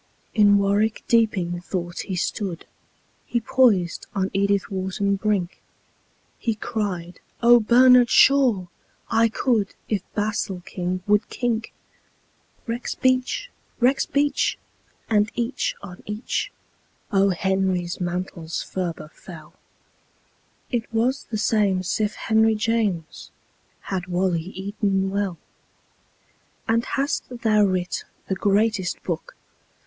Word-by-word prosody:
In 205 -2 +5
warwick 205 +2 +1
deeping 190 -7 +2
thought 175 -1 -4
he 190 - -3
stood 180 -1 -3 0.6
He 240 - 0
poised 225 -8 +2
on 190 0 0
edithwharton 200 0 0
brink; 200 -4 -1 0.8
He 230 -2 -1
cried, 185 -5 -4 0.2
"Ohbernardshaw! 240 -1 +6 0.4
I 230 0 +4
could 220 -4 0
If 210 -4 0
basilking 185 -3 -2
would 210 +1 +2
kink." 230 -2 -2 1.0
Rexbeach! 255 - 0 0.3
rexbeach! 280 +3 +2 0.5
and 210 -1 +2
each 240 +2 -1
on 180 -2 -10
each 210 +3 -3 0.6
O. 195 -1 +4
Henry's 190 -1 0
mantles 175 -2 -3
ferber 170 -4 -4
fell. 160 -4 -12 1.2
It 235 -3 -2
was 240 +4 0
the 220 - -4
same'sif 210 -1 +1
henryjames 220 -5 0 0.5
Had 185 -1 -4
wally 180 -1 0
eaton 195 +1 -2
well. 200 -3 -1 1.3
"And 230 +1 +2
hast 280 +3 -1
thou 220 -4 +2
writ 185 -2 -1 0.2
the - - 0
greatest 200 -1 +1
book? 170 -3 -4
205 Hz, 95 wpm, -23 LUFS, 185-230 Hz, 1.3 s, Ohbernardshaw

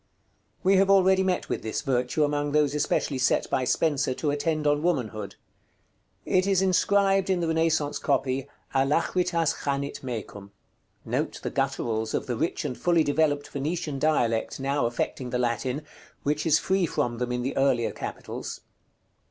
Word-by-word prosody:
We 190 +1 +5
have 195 +1 +4
already 190 -1 +5
met 185 -1 0
with - - -2
this 110 - -3
virtue 125 +3 +1
among 145 0 0
those 150 -2 +3
especially 145 -2 0
set 130 - +2
by 130 - +1
Spenser 140 -2 +1
to 150 +1 -1
attend 155 +1 -1
on 145 0 +2
Womanhood. 120 - -2 0.9
It 185 +1 +2
is 195 -2 +3
inscribed 195 +1 +3
in 185 -2 +2
the 170 - -1
Renaissance 160 -2 +1
copy, 130 0 0 0.3
"ALACHRITAS 165 +4 +1
CHANIT 140 0 -2
MECUM." 105 -5 -7 0.5
Note - - -2
the - - -3
gutturals 110 -1 -1
of - - -2
the - - -2
rich - - -2
and 125 - -2
fully 170 +1 +2
developed 145 -1 +1
Venetian 150 0 -3
dialect 120 -8 +1
now 135 -2 0
affecting 125 +1 -3
the 125 - -1
Latin, 125 +4 -1 0.4
which 150 +2 0
is 155 -1 +5
free 190 0 +1
from 120 -5 -2
them 125 0 -2
in 125 0 -1
the 135 - -2
earlier 135 -4 +2
capitals. - - -6
145 Hz, 160 wpm, -26 LUFS, 130-165 Hz, 0.9 s, We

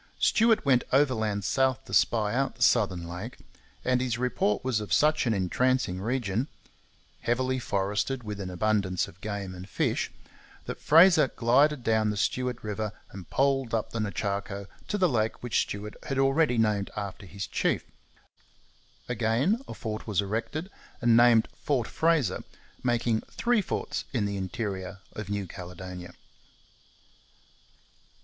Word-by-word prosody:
Stuart 225 -3 +3
went 130 -3 +4
overland 110 -7 +2
south 130 +6 +1
to - - -10
spy 110 -2 +3
out 135 +1 0
the 120 - -1
southern 95 -7 +2
lake; 90 +8 -7 0.5
and 125 0 +2
his 125 -3 -1
report 120 -4 0
was 125 -4 +1
of 105 -4 -7
such 150 - +3
an 115 - +3
entrancing 95 0 +1
region 115 +1 -1 0.7
heavily 130 +2 0
forested, 105 +5 -1
with 105 -2 -5
an 95 -2 -4
abundance 95 -1 0
of 90 - -16
game 100 -3 -4
and 90 +2 -9
fish - - 0 0.6
that - - -6
Fraser 165 -1 +7
glided 130 +4 +3
down 110 -1 +2
the 105 - -2
Stuart 125 +3 -1
river 105 0 -3 0.2
and 95 -3 -10
poled 135 -3 +1
up 110 - -2
the 115 - -3
Nechaco 100 -1 -2 0.2
to 205 - -1
the 185 -2 +4
lake 110 -6 -1
which 120 - +2
Stuart 105 +1 -5
had 135 - -4
already 135 -1 +3
named 105 -3 +1
after 100 -1 -5
his 95 +2 -5
chief. - - 0 1.2
Again 125 - +1
a - - -7
fort 110 0 -5
was 105 -4 0
erected 115 - -2 0.3
and 120 -1 +4
named 120 -1 +6
Fort 130 -6 0
Fraser, 160 - +1 0.4
making 120 -2 +1
three 235 -2 +1
forts - - -3
in 115 -6 +1
the 100 0 -2
interior 95 0 -4 0.2
of 105 -2 -6
New 100 -1 -2
Caledonia. 90 0 -8
110 Hz, 145 wpm, -28 LUFS, 100-130 Hz, 1.2 s, Fraser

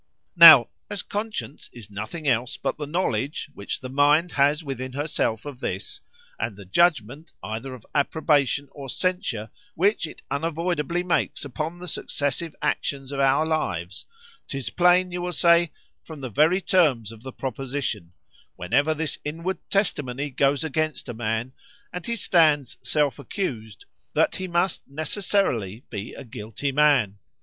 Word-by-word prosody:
] - - -53
"Now,—as 170 - +8
conscience 210 -8 -5
is 110 -4 -11
nothing 110 - -5
else 120 -1 +1
but - - -2
the 150 -1 -5
knowledge 150 -3 -2
which 100 -5 -5
the 130 - -5
mind 145 +5 +3
has 145 +3 +2
within 130 -2 -5
herself 140 -6 -1
of 140 -4 -7
this; - - -4 0.4
and 110 - -2
the 100 - -11
judgment, 150 - +1
either 115 +5 -5
of 120 - -15
approbation 145 -2 +2
or 140 -2 -9
censure, 180 - -2 0.2
which 195 0 +2
it - - -13
unavoidably 165 +2 -1
makes 175 -4 0
upon 155 +5 -4
the 180 0 -9
successive 150 0 -2
actions 135 -1 -1
of 140 - -4
our 135 +3 +3
lives; 95 - -2 0.4
'tis 135 -2 -3
plain 180 +1 +4
you 175 0 -3
will 180 0 -2
say, 170 -2 +4 0.3
from 160 -2 -10
the 130 -3 -6
very 160 - +3
terms 140 - +2
of 115 -1 -13
the 130 +2 -7
proposition,—whenever 130 - -3
this 155 -1 -2
inward 165 +5 -3
testimony 145 -8 0
goes 135 +1 +2
against 155 -2 -2
a - - -3
man, 115 +2 -2 0.4
and 180 -1 -6
he 235 - -1
stands 155 - +3
self 145 -4 0
accused, 120 - -5 0.3
that - - +2
he 185 - -4
must 175 -1 0
necessarily 140 - -1
be 105 -1 -6
a - - -8
guilty 120 +3 -4
man. 135 -9 +3
145 Hz, 150 wpm, -25 LUFS, 125-170 Hz, 0.4 s, Now,—as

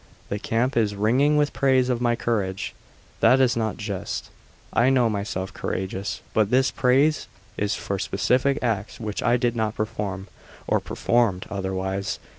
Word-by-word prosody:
The 100 - -2
camp 115 +5 0
is 105 -3 +1
ringing 130 +9 +3
with 145 -1 +2
praise 130 -2 +3
of 125 -2 0
my 120 -1 +2
courage. 100 -5 -2 0.5
That 130 - +5
is 130 -2 +3
not 110 -2 -1
just; 105 -4 -4 0.4
I 120 +3 +4
know 125 -4 +3
myself 100 -2 -3
courageous, 95 +1 -3
but 110 -2 +2
this 130 +2 +3
praise 135 +5 +2 0.3
is 105 +1 -1
for 100 -2 -3
specific 130 +9 +1
acts 110 -4 -2
which 105 -3 -4
I 120 0 +3
did 120 -1 0
not 110 -2 -1
perform, 105 -3 -3 0.4
or - - +2
performed 115 -6 0
otherwise. 95 0 -2
110 Hz, 155 wpm, -24 LUFS, 100-125 Hz, 0.5 s, That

